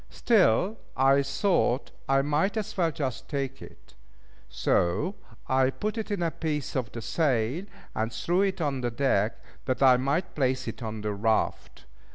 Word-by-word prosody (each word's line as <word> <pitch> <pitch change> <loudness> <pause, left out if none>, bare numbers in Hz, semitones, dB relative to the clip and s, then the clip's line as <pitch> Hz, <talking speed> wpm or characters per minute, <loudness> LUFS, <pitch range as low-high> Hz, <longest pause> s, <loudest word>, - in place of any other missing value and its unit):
Still, 205 - +3 0.2
I 135 +1 +5
thought 140 -2 +1 0.2
I 135 0 +4
might 155 +9 +1
as 215 - -3
well 170 -4 +2
just 135 -5 -4
take 135 -2 -3
it; - - -14 0.6
so 85 - +1 0.3
I 130 0 +3
put 210 +10 -3
it 220 -1 -4
in 200 -4 -1
a 165 - 0
piece 150 -3 -3
of 125 -5 -2
the 115 - -7
sail, 140 - 0 0.3
and 110 +1 -1
threw 175 +11 0
it 195 -2 0
on 140 -5 -1
deck 115 -3 +1 0.3
that 130 0 0
I 130 -2 +7
might 150 +8 -1
place 130 -2 0
it - - -6
on 110 -2 -4
the 105 0 -2
raft. 110 +2 -1
135 Hz, 165 wpm, -27 LUFS, 120-170 Hz, 0.6 s, I